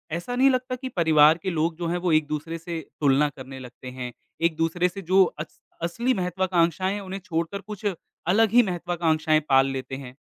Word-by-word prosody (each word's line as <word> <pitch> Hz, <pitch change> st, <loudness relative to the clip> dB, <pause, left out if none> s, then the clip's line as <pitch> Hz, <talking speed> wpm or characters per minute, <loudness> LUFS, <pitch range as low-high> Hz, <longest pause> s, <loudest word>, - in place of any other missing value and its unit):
ऐसा 175 Hz, +9 st, -4 dB
नहीं 265 Hz, +2 st, +5 dB
लगता 255 Hz, -1 st, 0 dB
कि 260 Hz, +1 st, -6 dB
परिवार 160 Hz, -5 st, +5 dB
के 190 Hz, -, -1 dB
लोग 165 Hz, -1 st, 0 dB
जो 170 Hz, -1 st, -3 dB
हैं, 175 Hz, +1 st, 0 dB
वो 175 Hz, -1 st, 0 dB
एक-दूसरे 155 Hz, +1 st, 0 dB
से 165 Hz, 0 st, -5 dB, 0.2 s
तुलना 145 Hz, +1 st, +4 dB
करने 135 Hz, -1 st, -10 dB
लगते 125 Hz, 0 st, -10 dB
हैं, 125 Hz, -1 st, -6 dB, 0.3 s
एक-दूसरे 165 Hz, +2 st, +1 dB
से 195 Hz, +3 st, -8 dB
जो 190 Hz, +2 st, +5 dB
अस 155 Hz, -2 st, -8 dB, 0.2 s
असली 235 Hz, +10 st, 0 dB
महत्वाकांक्षाएँ 180 Hz, -1 st, 0 dB
हैं, 205 Hz, -, -4 dB
उन्हें 195 Hz, 0 st, -6 dB
छोड़कर 170 Hz, +1 st, -2 dB
कुछ 210 Hz, +1 st, -9 dB, 0.4 s
अलग 215 Hz, +4 st, +4 dB
ही 245 Hz, +2 st, +7 dB
महत्वाकांक्षाएँ 170 Hz, -4 st, +1 dB
पाल 135 Hz, 0 st, +5 dB
लेते 135 Hz, 0 st, -5 dB
हैं? 130 Hz, -1 st, -9 dB
170 Hz, 185 wpm, -25 LUFS, 155-190 Hz, 0.4 s, ही